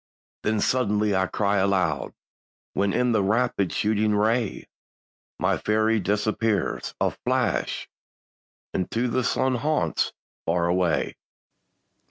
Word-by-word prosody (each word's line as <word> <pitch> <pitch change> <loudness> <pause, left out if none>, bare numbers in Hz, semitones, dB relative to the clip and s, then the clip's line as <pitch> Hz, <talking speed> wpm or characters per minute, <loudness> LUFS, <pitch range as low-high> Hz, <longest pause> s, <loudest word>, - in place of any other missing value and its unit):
Then 105 0 0
suddenly 105 -5 +1
I 95 0 +2
cry 100 +1 0
aloud, 95 -7 +1 0.6
When 100 +1 +1
in 125 0 +2
a 105 - +3
rapid 105 -1 +1
shooting 105 0 +1
ray, 110 +1 0 0.7
My - - +1
fairy 110 +1 +2
disappears, 105 0 -1
a - - +2
flash, - - -1 0.9
Into 115 +7 -1
the 125 +1 0
sun 130 +2 +1
haunts 130 - 0 0.3
far 85 +1 +1
away. 85 -2 +1
105 Hz, 110 wpm, -25 LUFS, 95-115 Hz, 0.9 s, a